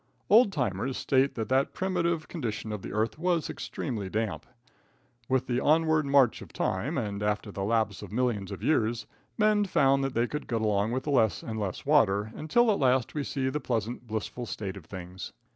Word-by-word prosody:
Old 220 0 +7
timers 125 - -1
state 135 +1 +2
that 110 -2 -3
the 130 +1 +4
primitive 170 -3 -1
condition 110 -9 -4
of 105 -2 -4
the - - -7
earth 110 +7 -1
was 175 -2 0
extremely 110 -8 -4
damp. 100 -7 -2 0.8
With 130 -1 +2
the 125 -1 0
onward 160 0 +3
march 140 -4 +4
of - - -11
time, 130 - -1
and 105 -5 -3
after 105 0 -1
the 95 - -4
lapse 110 -2 0
of - - -9
millions 115 -4 -1
of - - -7
years, 115 -6 +1 0.3
men 210 -1 +4
found 140 -6 +3
that 135 -1 -2
they 115 +1 +3
could 150 +4 -5
get 115 -2 -1
along 105 0 +1
with 130 +2 -2
less 115 - +2
and 110 -1 -4
less 100 -4 -4
water, 110 -8 +3
until 225 +10 +2
at 200 - 0
last 130 -2 +2
we 150 - -2
see 135 -1 -2
the 150 - -2
pleasant, 120 -1 -3
blissful 110 +2 -4
state 100 -3 -5
of 95 -5 -11
things. 90 0 -8
120 Hz, 195 wpm, -28 LUFS, 105-145 Hz, 0.8 s, Old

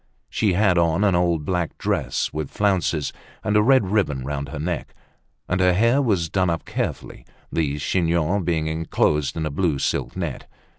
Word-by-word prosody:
She 100 -4 +1
had 90 -2 +3
on 85 +3 +2
an 100 -2 +3
old 85 -3 +1
black 90 -2 -2
dress - - -1
with 75 -2 -3
flounces, 95 -7 0 0.3
and 105 - 0
a 105 - +6
red 115 -5 +3
ribbon 75 -12 0
round 70 -1 -4
her 70 - -6
neck; 85 +4 -4 0.5
and 95 +1 0
her 90 -1 +4
hair 115 +8 +3
was 100 -10 +1
done 95 +2 +1
up 85 -1 -2
carefully, - - -4 0.3
the 75 -3 0
chignon 85 +4 +1
being 80 -2 0
enclosed 80 -2 0
in 80 - -1
a 75 - -2
blue 75 -1 0
silk - - -2
net. - - -4
85 Hz, 180 wpm, -23 LUFS, 75-95 Hz, 0.5 s, a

